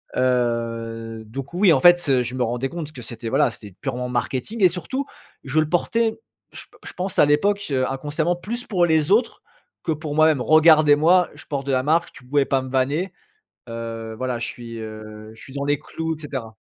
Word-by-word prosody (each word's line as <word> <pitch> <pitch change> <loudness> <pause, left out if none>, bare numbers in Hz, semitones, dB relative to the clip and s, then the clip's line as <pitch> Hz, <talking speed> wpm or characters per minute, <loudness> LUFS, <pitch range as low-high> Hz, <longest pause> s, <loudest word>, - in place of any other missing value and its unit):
Heu, 115 -2 -1
donc 135 +7 -7
oui, 185 0 +4
en 135 - +4
fait, 175 0 +7
heu, 130 -2 +3
je 120 - -5
me 130 - -3
rendais 120 +3 -1
compte 160 -2 -6
que 125 -5 -10
c'était 115 0 -6
voilà, - - +3
c'était 100 -4 -12
purement 125 -2 -3
marketing. 130 - -2
Et 185 - +8
surtout 225 - -4 0.4
je 140 +3 0
le 155 -1 +1
portais, 225 +6 0 0.3
je - - -8
p - - -23
je - - -8
pense 185 0 -3
à - - +7
l'époque, 200 +8 +1
heu, 130 -2 +1
inconsciemment, 150 +5 -1
plus 235 +7 -6
pour 180 -4 +2
les 160 0 +2
autres 230 +3 +2 0.4
que 165 - -1
pour 155 -1 -4
moi-même. 155 -3 +4
«Regardez-moi, 155 +3 +5
je - - -12
porte 140 -1 -4
de - - 0
la 130 -1 +1
marque», 165 +4 +1
tu 130 - -15
pouvais 140 +2 +2
pas 135 -1 0
me 130 - -7
vanner, 145 +8 0 0.6
heu, 115 -1 -6
voilà 125 0 -2
je 120 - -3
suis, 115 -1 -8
heu, 110 0 -9
je 110 - -14
suis 135 - -12
dans 140 0 -3
les 145 0 0
clous 160 +1 -4
et - - -17
cetera. 130 -7 -6
140 Hz, 210 wpm, -22 LUFS, 120-165 Hz, 0.6 s, Et